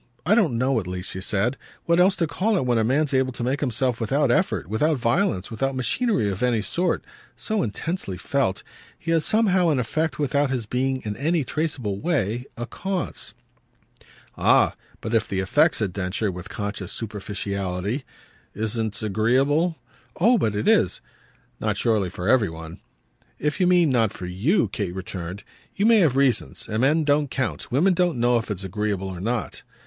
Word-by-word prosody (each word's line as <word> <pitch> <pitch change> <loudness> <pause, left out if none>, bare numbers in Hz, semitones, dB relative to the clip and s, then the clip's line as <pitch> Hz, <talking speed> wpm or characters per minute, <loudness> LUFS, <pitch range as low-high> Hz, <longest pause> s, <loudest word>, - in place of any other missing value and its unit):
I 190 - +4
don't 180 - +3
know 130 0 +2
at 95 - -6
least," 90 0 -5
she 95 - -5
said, 105 +7 0 0.3
"what 170 +1 +3
else 190 +2 +5
to 170 - +1
call 195 +8 0
it 135 - 0
when 120 -2 +2
a - - +2
man's 140 +5 +1
able 130 0 +2
to 120 - -5
make 130 +4 0
himself 125 -2 -1
without 135 +4 +2
effort, - - +1
without 145 - +1
violence, 120 - 0
without 135 +4 -1
machinery 130 - +1
of 95 - -5
any 120 -4 +2
sort, 180 +8 -1 0.3
so 215 -2 -2
intensely 115 - -3
felt. 95 +2 -1 0.3
He 170 - -4
has 165 -2 +2
somehow 190 -6 +3
an 150 - +2
effect 155 +6 -1
without 145 -1 +1
his 125 -4 -2
being 130 +3 -1
in 105 -2 -3
any 160 +2 +1
traceable 130 -8 -2
way 125 - -1
a 120 - -3
cause." 190 +6 -4 1.0
"Ah - - +4 0.3
but 110 - -4
if 115 -1 +2
the 95 - -2
effect," 95 0 +3
said 100 -4 -2
Densher 95 +2 -1
with 90 0 -8
conscious 100 -2 -4
superficiality, 100 +1 -3 0.5
"isn't 110 -1 -2
agreeable 135 - +2 0.2
?" - - -34
"Oh 230 +6 +5
but 105 -2 0
it 105 - -1
is!" - - +3 0.6
"Not - - -1
surely 110 -5 +1
for 90 +1 -5
every 115 -5 +4
one." 80 0 -9 0.6
"If 150 +4 -1
you 180 - +3
mean 175 -4 +4
not 115 -5 +2
for 90 - -7
you," 110 - +1
Kate 95 -3 -3
returned, 95 0 -6 0.3
"you 200 - +1
may 230 -1 +6
have 155 -9 +3
reasons 135 -3 +1
and 110 +1 -1
men 150 +5 +3
don't 145 -1 +2
count. 110 - -3
Women 170 +10 +4
don't 175 -4 +1
know 120 0 +3
if 115 - -7
it's 100 -2 -3
agreeable 100 0 -2
or 95 -2 -6
not." 115 +2 -2
125 Hz, 185 wpm, -24 LUFS, 105-155 Hz, 1.0 s, may